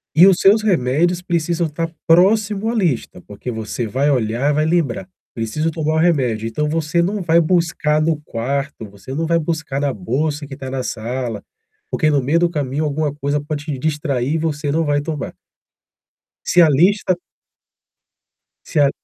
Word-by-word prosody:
E 170 - +8
os 190 -3 +5
seus 205 +3 +5
remédios 175 -2 +1
precisam 170 -1 0
estar 165 +2 -4 0.2
próximo 200 +5 +3
à 235 - -1
lista, 160 - -1
porque 105 +4 -6
você 110 +1 -4
vai 135 +6 0
olhar 125 +2 +1
e - - +1
vai 155 +1 +1
lembrar: 175 +3 0 0.3
"Preciso 115 +8 -1
tomar 155 -1 -1
o - - +2
remédio". 130 -10 +1
Então 150 +7 -1
você 165 +1 0
não 195 +3 -1
vai 170 0 +4
buscar 165 -3 +1
no 155 -1 0
quarto, 135 -2 -4
você 100 +6 -10
não 160 +4 -1
vai 170 0 +3
buscar 160 -4 -3
na 145 -1 +1
bolsa 145 - -2
que 135 - -8
tá 130 0 -7
na 130 0 -3
sala, 120 -2 -4 0.5
porque, 155 - +2
no 145 -2 +2
meio 150 +6 +2
do 175 0 +2
caminho, 150 -2 -2
alguma 150 0 -1
coisa 145 0 -1
pode 145 0 -5
te 150 -4 -3
distrair 145 -1 -1
e - - +2
você 150 -2 -2
não 160 +2 +1
vai 145 0 +1
tomar. 155 -1 -4 1.1
Se 175 - +5
a 165 - +6
lista 185 +6 +3 1.5
Se 155 - 0
a 140 -1 +5
150 Hz, 180 wpm, -19 LUFS, 135-170 Hz, 1.5 s, E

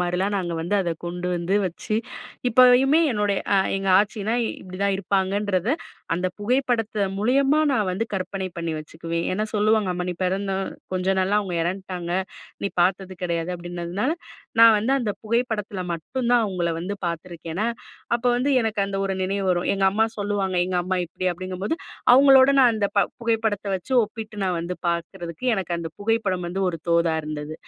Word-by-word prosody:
மாரிலாம் 180 +3 0
நாங்க 175 -3 -2
வந்து 175 +5 0
அத 170 -3 -1
கொண்டு 175 +1 -4
வந்து 175 +3 -1
வச்சு 185 +4 -3 0.5
இப்பயுமே 255 +5 +6
என்னுடைய 205 -2 +1 0.2
அ - - +5 0.2
எங்க 195 0 -2
ஆச்சினா 210 +1 0
இப்டிதான் 195 +2 -2
இருப்பாங்கன்றத, 195 +1 0 0.5
அந்த 180 +2 -1
புகைப்படத்த 225 -2 0
மூலியமா 275 +7 +3
நான் 215 -7 +1
வந்து 215 +5 -1
கற்பனை 190 0 -3
பண்ணி 170 -1 -2
வச்சுக்குவேன். 165 +2 -4
ஏன்னா, 210 +3 0
சொல்லுவாங்க, 215 -1 +3
"அம்மா 180 0 -3
நீ 180 - -2
பிறந்த 195 +2 -1 0.4
கொஞ்ச 185 0 -1
நாள்ல 195 +3 +2
அவுங்க 190 -4 -4
எறந்த்ட்டாங்க, 180 -1 -4 0.5
நீ - - +1
பாத்தது 190 +1 +1
கிடையாது" 170 -1 -1
அப்படின்னதுனால, 175 - -3 0.5
நான் 230 -1 +9
வந்து 230 +6 0
அந்த 225 -5 -1
புகைப்படத்தில 220 -4 -1
மட்டும் 235 +10 -3
தான் 240 -2 +5
அவுங்கள 180 -4 -1
வந்து 195 +4 -3
பாத்துருக்கேனா, 170 +3 -4 0.5
அப்ப 235 +1 -3
வந்து 260 +4 +1
எனக்கு, 220 -2 -2
அந்த 195 - -4
ஒரு 195 - -1
நினைவு 195 +1 -1
வரும். 175 -1 0
எங்க 195 - 0
அம்மா 220 +3 +2
சொல்லுவாங்க. 200 -2 -1
எங்க 185 0 -1
அம்மா 185 +1 -1
இப்படி 185 +2 -5
அப்படிங்கும்போது, 185 - -3 0.4
அவுங்களோட 270 0 +7
நான் 250 -3 +6
அந்த 205 -2 +1
ப - - +6 0.2
புகைப்படத்த 225 -3 0
வச்சு 190 +8 -8
ஒப்பிட்டு 215 0 -6
நான் 180 -2 0
வந்து 175 +2 -4
பாக்குறதுக்கு 170 +2 -4
எனக்கு 185 -3 -3
அந்த 165 -1 -4
புகைப்படம் 205 -4 0
வந்து 190 +2 -3
ஒரு 170 - -2
தோதா 170 -1 +3
இருந்தது. 150 0 -5
195 Hz, 165 wpm, -24 LUFS, 175-220 Hz, 0.5 s, நான்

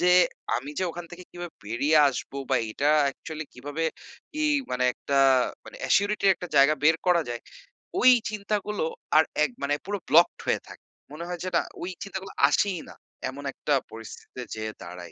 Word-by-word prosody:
যে 180 - +3 0.5
আমি 135 +4 -5
যে 185 - +1
ওখান 175 +1 -7
থেকে 180 +1 -10
কিভাবে 175 -1 -7
বেরিয়ে 140 +8 +2
আসবো 140 +1 -5
বা - - +4
এটা 145 +6 +1 0.2
actually 155 +3 -7
কিভাবে 145 +5 -4 0.6
ই - - +2 0.3
মানে 125 0 0
একটা 140 - -2 0.5
মানে - - -11
অ্যাসিউরিটি 200 0 +2
র - - +8
একটা 180 - -8
জায়গা 140 +3 +6
বের 160 +1 +6
করা 175 -2 +4
যায়, 120 - -4 0.6
ওই 255 - +8 0.2
চিন্তাগুলো 210 -2 -2 0.3
আর 160 - +8 0.2
এক 145 - +1
মানে, 145 +1 +1
পুরো 205 +1 -2
blocked 170 +4 +5
হয়ে - - +1
থাকে। - - -13 0.3
মনে 160 +3 -7
হয় 175 -1 -4
যে, 185 - -2
না। - - +3 0.2
ওই 180 - -3
চিন্তাগুলো 195 -1 -6 0.2
আসেই 195 -5 +1
না, - - -12 0.3
এমন 140 +2 -8
একটা 150 - -1 0.2
পরিস্থিতিতে 115 +3 -9
যেয়ে 110 0 -4
দাঁড়াই। 90 0 -9
160 Hz, 180 wpm, -26 LUFS, 135-180 Hz, 0.6 s, র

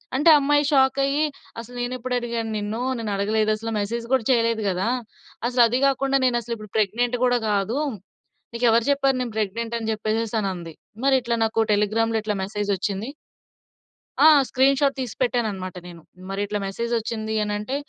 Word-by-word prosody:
అంటే 295 +5 +4
ఆ - - +8
అమ్మాయి 290 +1 +2
షాకయ్యి 275 +1 +2 0.3
"అసలు 235 +2 -10
నే‌న్నేప్పుడు 250 +1 -3
అడిగాను 235 -2 -3
నిన్ను? 210 +2 -3 0.2
నేనడగలేదసలా. 215 +1 -1
మెసేజ్ 230 +3 -3
కూడా 260 -3 +3
చేయలేదు 230 -3 +2
కదా! 185 +2 -1 0.6
అసలు 250 0 +2
అది 245 +3 0
కాకుండా 275 0 +1
నేనసలు 240 -2 0
ఇప్పుడు 215 -2 -12
ప్రెగ్నెంట్ 230 +4 +1
కూడా 245 -1 +3
కాదు. 205 +4 0 0.8
నీకెవరు 235 -1 +3
చెప్పారు 275 -1 +2
నేను 245 -2 -3
ప్రెగ్నెంట్ 225 +3 -2
అని" 225 -1 -3
చెప్పేసేసనంది. 215 -6 -2 0.3
మరి 275 -1 +5
ఇట్లా 235 0 -1
నాకు 225 0 0
టెలిగ్రామ్‌లో 220 +2 +1
ఇట్లా 210 0 -2
మెసేజ్ 205 +1 -3
వచ్చింది. 200 +6 -3 1.2
ఆ! - - +10 0.2
స్క్రీన్‌షాట్ 275 +1 +3
తీసి 250 -3 -4
పెట్టానన్నమాట 215 -7 -1
నేను. 170 -1 -11 0.3
మరిట్ల 205 +1 -2
మెసేజ్ 235 +5 -4
వచ్చింది 220 -1 -4
అనంటే, 210 +5 -3
230 Hz, 145 wpm, -23 LUFS, 210-250 Hz, 1.2 s, ఆ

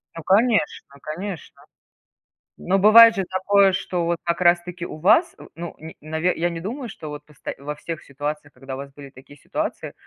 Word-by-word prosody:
Ну 165 - -8
конечно, 210 +2 +2
конечно. 175 +2 -7 1.0
Но 195 +2 +1
бывает 225 +3 +8
же 195 - -1
такое, 195 +1 +3
что 175 -2 -2
вот 170 0 0
как 170 +1 -1
раз 175 0 +5
таки 180 0 -8
у - - -8
вас, 200 - +3 0.2
ну, 170 0 -7
н 160 +1 -9 0.4
я 175 +1 0
не 165 -1 -5
думаю, 235 +7 -5
что 155 -6 -9
вот 150 0 -8
вот 150 -2 -21
просто - - -3
во 150 +1 -4
всех 165 +2 -7
ситуациях, 145 +1 -5
когда 135 +1 -9
у - - -7
вас 140 0 -8
были 140 -1 -11
такие 135 +3 -16
ситуации, - - -4
170 Hz, 190 wpm, -22 LUFS, 150-195 Hz, 1.0 s, бывает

